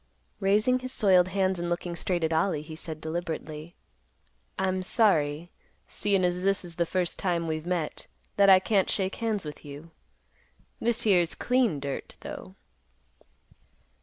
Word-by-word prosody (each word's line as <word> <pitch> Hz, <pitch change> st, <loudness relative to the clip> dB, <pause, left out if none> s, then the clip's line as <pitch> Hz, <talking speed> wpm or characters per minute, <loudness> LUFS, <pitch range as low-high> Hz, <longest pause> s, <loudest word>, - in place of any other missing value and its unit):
Raising 215 Hz, +6 st, +3 dB
his 255 Hz, 0 st, -6 dB
soiled 185 Hz, -7 st, +4 dB
hands 190 Hz, -1 st, 0 dB
and 175 Hz, 0 st, -2 dB
looking 175 Hz, 0 st, -3 dB
straight 175 Hz, -1 st, -1 dB
at 160 Hz, 0 st, +1 dB
Ollie, 160 Hz, -2 st, +1 dB
he 155 Hz, 0 st, -9 dB
said, 160 Hz, -1 st, -7 dB
deliberately, 160 Hz, 0 st, -5 dB, 0.8 s
"I'm 185 Hz, 0 st, 0 dB
sorry, 175 Hz, -6 st, +2 dB, 0.4 s
seein' 200 Hz, -2 st, 0 dB
as 180 Hz, 0 st, 0 dB
this 195 Hz, 0 st, +1 dB
is 170 Hz, -1 st, -8 dB
the 170 Hz, -1 st, +1 dB
first 180 Hz, -1 st, -1 dB
time 175 Hz, -3 st, 0 dB
we've 160 Hz, +1 st, -3 dB
met, 175 Hz, -4 st, -3 dB, 0.3 s
that 200 Hz, -1 st, +5 dB
I 190 Hz, -, +9 dB
can't 195 Hz, 0 st, +1 dB
shake 190 Hz, -1 st, -1 dB
hands 220 Hz, -6 st, 0 dB
with 150 Hz, -1 st, -8 dB
you. 145 Hz, +3 st, -10 dB, 0.9 s
This 235 Hz, 0 st, 0 dB
here's 180 Hz, -6 st, +3 dB
clean 245 Hz, -, +1 dB
dirt, 140 Hz, 0 st, -5 dB
though." -, -, -8 dB
180 Hz, 150 wpm, -27 LUFS, 160-195 Hz, 0.9 s, I